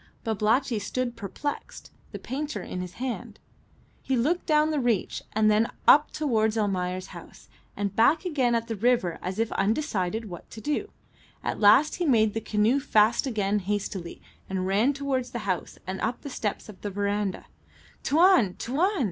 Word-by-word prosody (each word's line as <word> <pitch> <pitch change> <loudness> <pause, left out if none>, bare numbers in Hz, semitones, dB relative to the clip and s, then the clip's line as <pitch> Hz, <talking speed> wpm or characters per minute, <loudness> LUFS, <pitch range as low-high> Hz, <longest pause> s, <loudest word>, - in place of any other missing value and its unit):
Babalatchi 225 +3 +1
stood 240 +4 -3
perplexed, 230 +7 -6 0.2
the - - -5
painter 290 +4 -4
in 180 - -5
his 180 -1 -7
hand. 255 -1 -5 0.6
He 265 - 0
looked 315 +9 0
down 305 0 +3
the 300 - 0
reach, 240 -6 0
then 215 +1 +4 0.2
up 295 +1 +7
towards 225 -7 0
Almayer's 185 -3 -1
house, - - -13 0.3
and 200 -1 -2
back 300 +10 +4
again 265 -8 +1
at 230 0 0
the 225 - -3
river 215 -6 +1
as 185 +2 -4
if 225 0 0
undecided 215 -2 -1
what 175 -3 -10
to - - -9
do. 300 - -2 0.5
At - - -2
last 220 +9 +5
he 350 -2 -1
made 220 -5 +4
the 225 - -2
canoe 220 +5 +2
fast 220 -1 +3
again 210 -4 0
hastily, 195 -3 -4 0.3
and 190 -1 -2
ran 205 +8 +3
towards 270 -3 -2
the 240 - -5
house 185 -3 -2
and 190 +1 -5
up 230 +3 -2
the 285 - -7
steps 210 -4 -3
of 210 -4 -12
the 205 - -3
verandah. 200 0 -2 0.6
"Tuan! 320 - +4
Tuan!" 345 - 0
225 Hz, 165 wpm, -26 LUFS, 205-270 Hz, 0.6 s, up